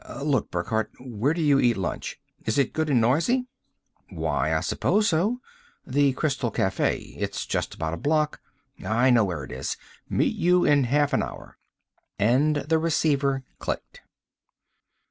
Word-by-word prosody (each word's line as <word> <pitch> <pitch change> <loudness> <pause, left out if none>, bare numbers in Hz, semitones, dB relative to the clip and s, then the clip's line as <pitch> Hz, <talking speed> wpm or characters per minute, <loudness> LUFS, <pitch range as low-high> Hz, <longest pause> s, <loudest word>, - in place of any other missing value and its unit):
Look, 140 -6 +1
Burckhardt, 105 +5 -1
where 125 +1 -1
do 165 - -1
you 145 -2 +4
eat 120 -4 +3
lunch? 90 -3 -4 0.3
Is 110 +3 0
it 140 - +2
good 160 -1 -1
and 130 -4 +4
noisy?" 160 - +2 0.6
"Why, - - -1
I - - +1
suppose 210 0 +1
so. 205 +10 +1 0.4
The 140 0 +2
Crystal 135 -4 -1
Cafe. 95 -2 -1
It's - - -3
just - - -2
about 80 0 -3
a - - -3
block 150 - 0 0.3
" - - -18
"I 120 +4 +3
know 120 -2 +5
where 85 -7 -4
it 65 - -9
is. 65 +1 -4 0.3
Meet - - +1
you 180 +1 +3
in 145 -3 +4
half 145 +3 +2
an - - +3
hour!" - - -8 0.6
And 130 +9 +3
the 150 +3 +1
receiver 140 -4 +1 0.2
clicked. - - -5
140 Hz, 160 wpm, -25 LUFS, 115-155 Hz, 0.6 s, know